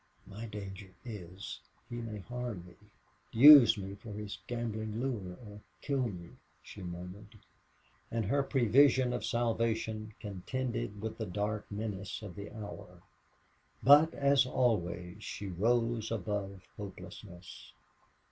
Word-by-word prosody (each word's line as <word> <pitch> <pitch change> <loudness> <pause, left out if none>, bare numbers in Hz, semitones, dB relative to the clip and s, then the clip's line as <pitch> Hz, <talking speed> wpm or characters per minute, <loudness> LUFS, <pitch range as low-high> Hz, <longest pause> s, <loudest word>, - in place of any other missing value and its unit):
"My 110 +4 -8
danger 100 -2 -8
is, 100 -4 -7 0.3
he 120 - -6
may 110 -3 -5
harm 120 -5 -5
me, 90 - -14 0.6
use 130 -2 +10
me 95 0 -5
for 105 +2 -10
his 105 0 -6
gambling 110 -2 -3
lure, 105 -9 -3
or 105 0 -11 0.2
kill 135 -3 0
me," 90 -5 -8 0.3
she 105 - -10
murmured. 90 +5 -8 0.7
And 115 -2 -1
her 140 +8 +2
prevision 130 0 +4
of 125 - -3
salvation 110 -2 -1
contended 105 +1 -4
with 110 0 -4
the 110 - -2
dark 105 +3 -3
menace 100 0 -4
of 100 -4 -8
the 100 0 -7
hour. 100 -4 -9 0.8
But, 145 +6 +7
as 140 -2 +4
always, 95 -6 0
she 100 - -5
rose 115 +4 +1
above 100 -3 -3
hopelessness. 95 -7 -10
105 Hz, 125 wpm, -32 LUFS, 100-120 Hz, 0.8 s, use